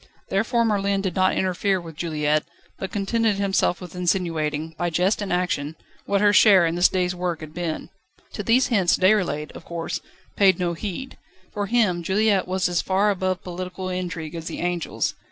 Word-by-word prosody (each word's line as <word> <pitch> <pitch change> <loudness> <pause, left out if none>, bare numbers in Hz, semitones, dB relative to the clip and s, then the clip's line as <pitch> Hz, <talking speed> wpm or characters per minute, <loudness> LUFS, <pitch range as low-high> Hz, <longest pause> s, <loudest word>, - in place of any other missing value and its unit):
Therefore 230 +4 +1
Merlin 200 -2 +1
did 190 -3 -3
not 185 0 +2
interfere 190 +1 +1
with 165 -2 -10
Juliette, 155 -2 0 0.3
but 190 - -4
contented 215 +1 +1
himself 195 -2 +1
with 180 -2 -10
insinuating, 165 -4 -1
by 175 +2 -1
jest 180 +6 +1
and 200 - -3
action, 170 -4 -1 0.3
what 200 0 +1
her 205 0 +5
share 195 -5 +7
in 165 - 0
this 175 +1 +4
day's 180 -1 0
work 175 -2 -3
had 155 -1 -9
been. 170 -2 -4 0.4
To - - -4
these 250 +3 +3
hints 195 -7 +3
Déroulède, 185 -6 +2
of - - -11
course, 170 -1 -4 0.3
paid 190 -3 +5
no 175 -1 -1
heed. 210 +9 -6 0.3
For 205 -1 -2
him 205 -7 +2
Juliette 200 +2 +2
was 185 0 0
as 175 -1 0
far 195 +2 +2
above 185 -1 -2
political 185 +1 -5
intrigue 180 -3 -4
as 165 -1 -6
the - - -5
angels. 175 -1 -1
185 Hz, 180 wpm, -23 LUFS, 170-200 Hz, 0.4 s, share